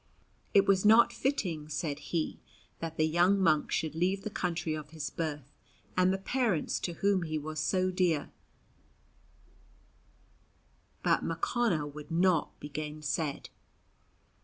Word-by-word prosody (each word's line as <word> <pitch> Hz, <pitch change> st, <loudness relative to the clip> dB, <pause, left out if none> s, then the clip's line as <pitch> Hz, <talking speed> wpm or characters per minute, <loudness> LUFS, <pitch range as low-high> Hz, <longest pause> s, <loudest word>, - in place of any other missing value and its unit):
It 200 Hz, 0 st, +7 dB
was 195 Hz, -1 st, +3 dB
not 220 Hz, +3 st, +6 dB
fitting, 175 Hz, -, -2 dB
said 150 Hz, -1 st, -3 dB
he, 160 Hz, +2 st, -3 dB, 0.4 s
that 165 Hz, -1 st, -5 dB
the 155 Hz, -, +3 dB
young 175 Hz, +5 st, +3 dB
monk 155 Hz, -6 st, +3 dB
should 160 Hz, -2 st, -1 dB
leave 185 Hz, +4 st, 0 dB
the 215 Hz, -, -4 dB
country 170 Hz, -4 st, -2 dB
of 155 Hz, -1 st, -6 dB
his 155 Hz, -3 st, -5 dB
birth 145 Hz, -4 st, -4 dB, 0.4 s
and 185 Hz, 0 st, +4 dB
the 190 Hz, -, 0 dB
parents 215 Hz, -, 0 dB
to 175 Hz, -, -3 dB
whom 195 Hz, +2 st, +1 dB
he 155 Hz, -2 st, -2 dB
was 155 Hz, +1 st, -5 dB
so 185 Hz, +3 st, +1 dB
dear; 180 Hz, -5 st, +1 dB, 2.7 s
but -, -, +2 dB
Mochonna 170 Hz, 0 st, 0 dB
would 145 Hz, +1 st, -9 dB
not 175 Hz, -1 st, +1 dB
be -, -, -7 dB
gainsaid. 150 Hz, 0 st, -3 dB
165 Hz, 135 wpm, -31 LUFS, 155-185 Hz, 2.7 s, It